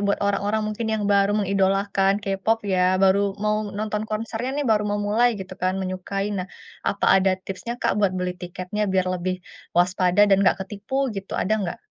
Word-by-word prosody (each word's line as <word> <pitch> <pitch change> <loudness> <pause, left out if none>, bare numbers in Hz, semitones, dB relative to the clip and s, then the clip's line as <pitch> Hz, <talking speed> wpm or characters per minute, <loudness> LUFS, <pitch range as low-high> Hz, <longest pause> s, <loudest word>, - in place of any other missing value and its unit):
buat 200 - +2
orang-orang 205 +2 0
mungkin 225 +1 -4
yang 215 - -2
baru 200 +1 +3
mengidolakan 195 0 +2
K-pop 195 +3 +1
ya, 185 0 +3
baru 195 +1 +3
mau 210 0 +2
nonton 210 +1 -3
konsernya 225 +3 -3
nih 290 - -1
baru 210 -1 +3
mau 205 - 0
mulai 235 +4 +4
gitu 190 0 -8
kan, 185 +1 +1
menyukai. 190 +1 -3
Nah, 185 -2 -3 0.4
apa 200 - -1
ada 190 0 +3
tipsnya 195 +5 -5
Kak, - - 0
buat 195 -3 +3
beli 180 0 -1
tiketnya 185 +3 -4
biar 185 -1 +2
lebih 185 +1 -2 0.4
waspada 180 +2 +4
dan 195 -1 +4
enggak 195 - +4
ketipu 205 +6 -6 0.2
gitu, 195 -1 -7
ada 215 - +1
enggak? 175 -3 -3
195 Hz, 180 wpm, -23 LUFS, 185-210 Hz, 0.4 s, mulai